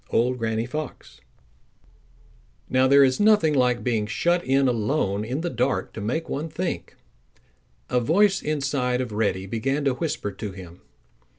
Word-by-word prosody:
—Old 125 +2 +1
Granny 110 0 -1
Fox. 150 +5 -7 1.5
Now 130 0 +3
there 140 +1 +6
is 130 -1 +2
nothing 205 -7 +4
like 125 -3 +2
being 115 -4 0
shut 175 +11 +1
in 135 +1 +2
alone 110 -3 0
in 130 +7 -3
the 175 - -2
dark 125 +2 -1
to 110 - -6
make 130 +11 -2
one 155 +4 -4
think. 170 +3 -4 0.9
A 125 - +1
voice 190 - +3
inside 140 -4 -1
of 125 -3 -3
Reddy 105 -3 -1
began 135 +8 -2
to 135 - +3
whisper 130 -8 -3
to 100 +1 -6
him. 90 -2 -12
130 Hz, 155 wpm, -24 LUFS, 110-150 Hz, 1.5 s, there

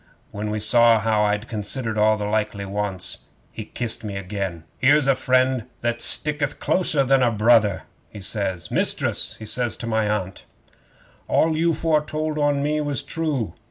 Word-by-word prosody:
When 105 +1 -4
he 105 - -2
saw 115 +1 +6
how 110 -1 +1
I'd 105 +2 -1
considered 110 +1 -3
all 110 0 +3
his 105 - -4
likely 105 -1 -2
wants, 95 -2 -3 0.3
he - - -8
kissed 120 -2 -4
me 100 -2 -5
again. 95 -3 -5 0.2
'"Here's 145 +2 +4
a 135 -1 +3
friend 130 -2 +1 0.2
that 120 0 -2
sticketh 150 -1 +3
closer 160 -6 +1
than 135 0 +2
a 125 - +3
brother!" 110 -2 +3 0.3
he 105 - -11
says. 95 -3 -3
"Mistress," - - 0
he 110 - -10
says 120 +2 -1
to - - -7
my 110 -2 0
Aunt, 95 -3 -4 0.8
"all 160 0 +2
you 165 +2 +1
foretold 155 -1 -1
on 145 -1 +1
me 150 +1 0
was 145 -4 -1
true. 145 - -3
115 Hz, 165 wpm, -22 LUFS, 105-140 Hz, 0.8 s, saw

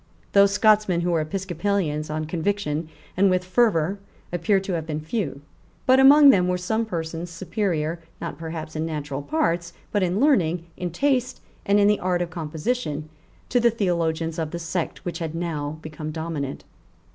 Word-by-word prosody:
Those 200 0 +6
Scotchmen 210 -4 +3
who 175 +1 0
were 165 -2 +2
Episcopalians 175 -2 -2
on 155 0 -2
conviction 160 -2 -2 0.3
and 195 +2 +4
with 185 0 +1
fervour 190 -3 +2 0.3
appear 175 +3 +2
to 190 -1 -4
have 165 -2 -3
been 155 -1 -2
few; 155 - -3 0.4
but 260 +1 +5
among 280 +1 +9
them 180 -6 +3
were 180 0 +1
some 220 +5 -1
persons 165 -2 -4
superior, 170 -2 -2 0.2
not - - -6
perhaps 160 -1 -6
in 155 - -1
natural 145 -3 -4
parts, 170 - -1 0.2
but 205 - +1
in 185 +2 +1
learning, 180 - +2
in 180 -1 -3
taste, 255 - 0 0.3
and 200 +1 +4
in 200 - +5
the 210 0 +3
art 180 -1 0
of 175 - -7
composition, 160 0 -3 0.4
to 245 - +3
the 235 0 +5
theologians 165 -6 -1
of 160 -2 -2
the 170 - -5
sect 170 0 -4
which 175 - -4
had 165 -1 -4
now 155 -3 -3
become 155 0 -6
dominant. 155 -3 -4
170 Hz, 170 wpm, -24 LUFS, 160-200 Hz, 0.4 s, among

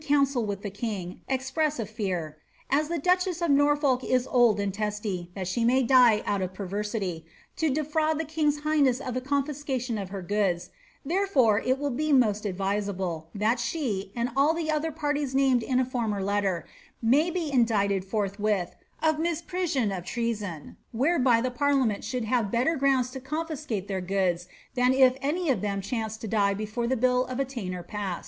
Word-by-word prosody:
319 285 -1 +4
council 265 -4 0
with 200 -1 -4
the 205 - -4
king, 200 -4 -5
express 270 +4 0
a 225 - -2
fear, 185 -8 -4 0.3
^ - - +5
as 300 +1 +1
the 340 +1 -2
duchess 360 +2 +1
of 340 -3 +1
Norfolk 285 -2 +3
is 255 0 +1
old 240 -5 +3
and 200 -1 -1
testy, 210 -4 -3
that 190 -2 -4
she 210 +6 0
may 255 +3 +4
die 240 -4 +5
out 200 -1 0
of 185 0 -4
perversity, 200 -3 -3 0.3
to 320 - +1
defraud 310 +2 0
the 320 - -1
king's 300 -1 0
high 305 0 +1
ness 260 -3 +3
of 255 - -4
the 255 - -2
confiscation 270 -4 -2
of 195 -2 -5
her 195 -1 -6
goods; 180 -3 0 0.3
therefore 285 - +3
it 260 +3 +1
will 285 0 -2
be 305 +5 -1
most 215 -6 +3
advisable, 195 -4 -2
that 220 +4 +1
she, 235 -7 -2
and 240 +1 -1
all 290 +4 +4
the 325 -2 -1
other 310 +1 0
parties 290 -3 -2
named 265 -3 +4
in 255 +2 0
a 260 - +2
former 225 -6 -2
letter, 195 -3 0 0.3
may 275 +9 +3
be 335 -4 -2
in 250 -3 +5
dicted 200 -4 +1
forthwith 200 -1 -1 0.3
of 315 -1 +3
misprision 335 - -1
of 180 - -5
treason, 205 -7 -4
whereby 255 -1 +3
the 255 +2 -1
parliament 270 -5 +1
should 250 -3 -3
kare 240 +2 +2
better 235 +9 +1
grounds 265 -3 +2
to 265 - -6
canfiske 300 - -4
their 195 -2 -3
goods 180 -2 0 0.3
than 250 0 +3
if 260 -1 +6
any 305 +3 0
of 220 -8 0
them 200 -1 -1
chanced 220 +2 -4
to 225 - -4
die 200 -2 +2
before 215 +3 -3
the 260 +1 +1
bill 250 +1 +3
of 255 0 -4
attainder 215 -10 -3
past." 195 -1 -4
245 Hz, 190 wpm, -27 LUFS, 200-285 Hz, 0.3 s, if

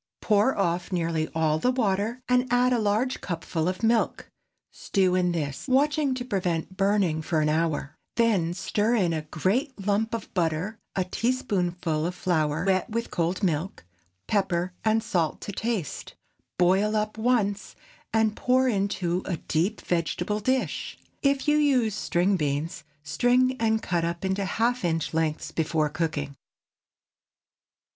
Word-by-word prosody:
Pour 210 +5 +2
off 175 -2 0
nearly 165 -3 0
all 155 -1 +2
the 250 - +2
water, 230 0 0
and 250 0 +3
add 250 +1 +4
a 240 - +2
large 220 +5 0
cupful 165 -2 -2
of 185 +3 -3
milk. 225 0 +1 0.4
Stew 190 -3 +1
in 180 -1 +2
this, 150 - -3
watching 285 +1 +2
to 245 -1 -4
prevent 185 -5 -2
burning, 195 -5 +2
for 160 0 0
an 150 0 +2
hour; 155 -2 -1 0.2
then 195 -8 +2
stir 210 +5 0
in 180 -7 +2
a 160 - -1
great 205 - -1
lump 215 +2 +1
of 230 - -7
butter, 175 +4 -1 0.2
a 190 - +1
teaspoonful 180 -7 -1
of 180 - -5
flour 160 -2 0
wet 190 +3 +1
with 230 +1 -3
cold 175 +3 -1
milk, 165 - -1 0.4
pepper 185 -3 0
and 220 0 +2
salt 175 -9 0
to - - -5
taste. 210 - -3 0.4
Boil 190 +4 +3
up 215 0 -1
once, 215 -4 0 0.4
and 220 -1 +2
pour 255 +1 +2
into 195 -5 0
a 175 - -2
deep 175 +9 -1
vegetable 175 +4 -1
dish. 260 +4 -1 0.2
If 275 0 +1
you 295 0 +4
use 260 -7 +3
string 185 +1 +1
beans, 150 +2 -2 0.2
string 250 - +2
and 220 -1 +1
cut 170 -2 0
up 170 +2 -2
into 190 +1 0
half 235 +5 0
inch 165 -2 -1
lengths 160 -1 -1
before 155 -1 0
cooking. 145 -3 -3
190 Hz, 150 wpm, -26 LUFS, 165-225 Hz, 0.4 s, add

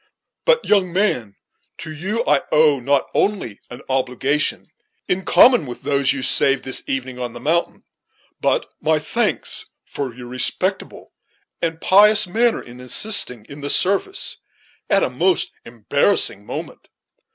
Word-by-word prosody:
But, - - +3
young 190 -4 +2
man, 125 - 0 0.4
to 160 -1 -8
you 200 +9 -2
I 145 -2 +3
owe 150 -2 +4
not 140 +2 0
only 190 - -1
an 125 - -11
obligation, 135 +2 0 0.4
in 185 +1 -1
common 245 - +5
with 120 - -9
those 140 -2 +1
you 135 -2 -3
saved 135 0 +2
this 130 - -1
evening 130 -1 -4
on 120 -2 -5
the 120 - -9
mountain, 165 +7 -1 0.6
but - - 0 0.2
my - - +2
thanks - - -2 0.2
for 140 -3 -5
your 125 -1 -10
respectable 185 +10 -3 0.5
and 165 -1 -2
pious 210 +4 +5
manner 230 +6 0
in 120 +1 -13
assisting 125 - +2
in 140 +1 -11
the 145 - -3
service 200 - +1 0.5
at - - +3
a - - 0
most 360 -1 0
embarrassing 115 - 0
moment. - - -8
145 Hz, 140 wpm, -20 LUFS, 125-195 Hz, 0.6 s, common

